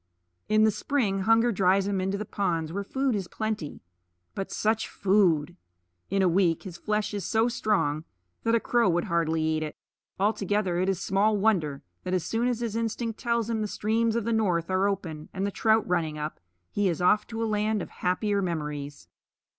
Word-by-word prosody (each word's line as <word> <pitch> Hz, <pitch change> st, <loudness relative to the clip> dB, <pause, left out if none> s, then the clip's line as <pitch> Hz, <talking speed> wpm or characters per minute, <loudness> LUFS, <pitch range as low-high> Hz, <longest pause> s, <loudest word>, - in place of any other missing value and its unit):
In 215 Hz, 0 st, +4 dB
the 220 Hz, -, +5 dB
spring 215 Hz, -6 st, 0 dB
hunger 225 Hz, +4 st, +4 dB
drives 190 Hz, -1 st, +3 dB
him 200 Hz, -2 st, 0 dB
into 190 Hz, +2 st, -1 dB
the 210 Hz, -, -4 dB
ponds 165 Hz, -6 st, -1 dB
where 200 Hz, +1 st, -2 dB
food 265 Hz, +5 st, 0 dB
is 195 Hz, -4 st, -2 dB
plenty 215 Hz, -8 st, -4 dB, 0.5 s
but 195 Hz, -, -4 dB
such 220 Hz, +1 st, 0 dB
food! 180 Hz, -5 st, +2 dB, 0.5 s
In 195 Hz, 0 st, +2 dB
a -, -, +4 dB
week 175 Hz, -2 st, +2 dB
his 185 Hz, -4 st, -8 dB
flesh 210 Hz, +2 st, -1 dB
is 200 Hz, -2 st, -3 dB
so 225 Hz, +6 st, +2 dB
strong 205 Hz, -10 st, 0 dB, 0.4 s
that 230 Hz, 0 st, +2 dB
a -, -, +4 dB
crow 235 Hz, -3 st, +2 dB
would 175 Hz, 0 st, +1 dB
hardly 165 Hz, -4 st, 0 dB
eat 155 Hz, 0 st, 0 dB
it. 155 Hz, -1 st, -4 dB, 0.4 s
Altogether, 205 Hz, -3 st, +1 dB
it 185 Hz, +1 st, +1 dB
is 190 Hz, -3 st, 0 dB
small 205 Hz, +2 st, +2 dB
wonder 180 Hz, -10 st, +1 dB, 0.2 s
that 185 Hz, -, -1 dB
as 180 Hz, -, 0 dB
soon 230 Hz, +2 st, 0 dB
as 240 Hz, -2 st, -1 dB
his 230 Hz, -2 st, -2 dB
instinct 230 Hz, 0 st, -2 dB
tells 235 Hz, -3 st, 0 dB
him 225 Hz, -2 st, -1 dB
the 210 Hz, -, -1 dB
streams 225 Hz, +2 st, 0 dB
of 235 Hz, -2 st, -1 dB
the 230 Hz, -, +1 dB
North 185 Hz, -6 st, +1 dB
are 190 Hz, +1 st, +3 dB
open 165 Hz, -6 st, -4 dB
and 190 Hz, +1 st, -2 dB
the 200 Hz, -, -1 dB
trout 220 Hz, +1 st, +2 dB
running 165 Hz, -4 st, 0 dB
up, 150 Hz, +1 st, -5 dB, 0.3 s
he 205 Hz, -2 st, +1 dB
is 170 Hz, -, -2 dB
off 195 Hz, +4 st, +3 dB
to 225 Hz, 0 st, -3 dB
a -, -, +1 dB
land 215 Hz, 0 st, 0 dB
of -, -, -10 dB
happier 200 Hz, +3 st, +1 dB
memories. 150 Hz, -5 st, -4 dB
200 Hz, 200 wpm, -27 LUFS, 175-220 Hz, 0.5 s, the